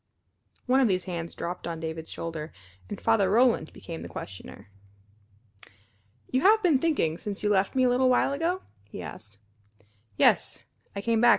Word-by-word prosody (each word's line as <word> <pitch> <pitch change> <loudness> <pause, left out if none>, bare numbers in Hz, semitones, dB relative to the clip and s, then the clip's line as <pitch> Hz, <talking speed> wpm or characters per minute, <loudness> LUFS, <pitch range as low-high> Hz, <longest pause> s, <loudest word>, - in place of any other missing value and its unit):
One 260 +1 +3
of 260 - +4
these 185 -3 +1
hands 170 -3 -5
dropped 175 +1 -5
on 165 -1 -4
David's 160 0 -5
shoulder, 160 -1 -5 0.4
and - - -5
Father 200 -4 +3
Roland 230 -6 +3
became 165 -1 -8
the - - -6
questioner. 100 +1 -9 1.6
"You 255 - +2
have 430 +5 +5
been 320 -7 +4
thinking, 260 - 0
since 205 -1 -6
you 210 - +2
left 195 +1 +2
me 260 - +3
a 250 - +4
little 255 +1 +3
while 255 +2 +3
ago?" 340 +6 -1 0.3
he 90 - -7
asked. 100 +8 -10 0.8
"Yes. - - +3 0.4
I 200 - -3
came 230 0 +2
back. 240 - +7
200 Hz, 170 wpm, -27 LUFS, 165-255 Hz, 1.6 s, back